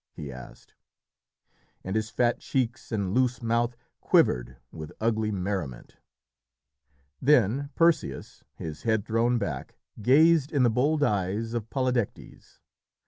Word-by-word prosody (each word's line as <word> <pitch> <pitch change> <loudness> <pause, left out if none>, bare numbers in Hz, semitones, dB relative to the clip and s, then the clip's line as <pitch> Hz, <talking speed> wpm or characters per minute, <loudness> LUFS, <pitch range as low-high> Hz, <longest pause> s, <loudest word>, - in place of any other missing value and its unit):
he 75 -3 -7
asked, 65 -1 -12 1.1
and 95 +2 -4
his 110 0 -1
fat 120 0 +1
cheeks 130 -1 -2
and 100 -4 -1
loose 125 0 +1
mouth 115 0 0 0.2
quivered - - +2
with 80 -2 -8
ugly 110 -1 0
merriment. 90 -10 -4 1.2
Then 135 0 +3
Perseus, 165 - 0
his 80 -2 -7
head 110 -3 0
thrown 115 +2 +1
back, 75 - -4 0.3
gazed 150 +5 +4
in 140 -4 +2
the 120 - +4
bold 145 +6 +1
eyes 105 0 -1
of 115 -2 -4
Polydectes. 125 -5 -3
115 Hz, 120 wpm, -27 LUFS, 95-125 Hz, 1.2 s, gazed